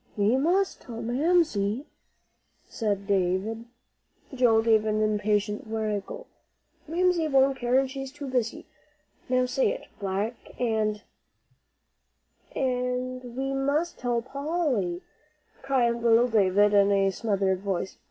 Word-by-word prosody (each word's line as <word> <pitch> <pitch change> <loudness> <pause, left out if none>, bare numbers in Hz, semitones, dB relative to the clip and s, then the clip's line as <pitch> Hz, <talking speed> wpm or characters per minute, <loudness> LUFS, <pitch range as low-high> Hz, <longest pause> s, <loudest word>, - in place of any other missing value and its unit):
"We 210 +4 +3
must 355 +8 +1
tell 230 -3 -8
Mamsie," 260 - +1 0.8
said 205 -3 -2
David. 200 +3 0 0.7
Joel 235 -4 +3
gave 220 -2 +4
an 215 0 0
impatient 210 -1 0
wriggle. 220 - -3 0.6
"Mamsie 345 0 +1
won't 270 -1 +3
care, 245 +1 +2
and 265 -1 +1
she's 270 -1 -6
too 290 0 -8
busy. 250 -4 -2 0.6
Now 255 0 +2
say 255 +1 +1
it, - - -7
'black 200 +4 -4
and 215 -3 0 0.7
"' - - -35
"And 250 -1 -2
we 270 +1 -2
must 285 +5 -1
tell 240 -2 -1
Polly," 270 - -2 0.6
cried 265 -3 +2
little 235 +1 +4
Davie, 200 -4 +2 0.2
in 200 0 +5
a 195 -1 +3
smothered 195 -2 0
voice. 190 -1 -3
235 Hz, 120 wpm, -27 LUFS, 210-270 Hz, 0.8 s, in